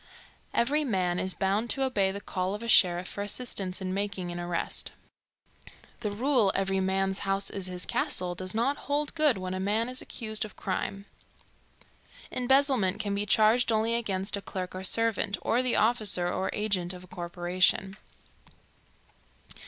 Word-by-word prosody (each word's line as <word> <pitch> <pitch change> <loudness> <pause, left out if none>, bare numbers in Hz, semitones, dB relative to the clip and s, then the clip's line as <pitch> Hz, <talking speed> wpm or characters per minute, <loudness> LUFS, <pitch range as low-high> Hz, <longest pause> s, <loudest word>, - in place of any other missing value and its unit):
Every 290 +6 +2
man 185 -8 0
is 190 0 -1
bound 205 +4 0
to 270 - +1
obey 205 -7 +1
the 200 - -5
call 185 0 -2
of 210 - -7
a - - -5
sheriff 180 -4 +4
for 200 - -4
assistance 200 -3 -3
in 185 0 -2
making 195 -3 -3
an 175 - -5
arrest. 175 -1 -2 1.1
The 220 -3 -2
rule 230 -1 +2
"Every 195 0 0
man's 190 0 0
house 195 0 -1
is 195 -2 -2
his 180 -1 -2
castle" 180 -1 -1
does 185 +2 -4
not 255 +6 +1
hold 290 +1 0
good 305 -7 +4
when 185 0 -4
a 185 - -3
man 210 +4 0
is 255 +1 -3
accused 220 -2 -3
of 215 - -8
crime. 195 +1 -3 1.3
Embezzlement 255 -6 +2
can 205 -2 -2
be 205 +1 -1
charged 220 +3 +4
only 220 +1 +1
against 200 -4 0
a 200 - -5
clerk 185 -2 -5
or 185 0 -6
servant, 225 0 +3
or 240 - +2
the 255 -1 +1
officer 215 -6 +3
or 190 - -1
agent 195 -4 -1
of 180 0 -10
a - - -14
corporation. 180 +2 0
200 Hz, 165 wpm, -28 LUFS, 185-230 Hz, 1.3 s, sheriff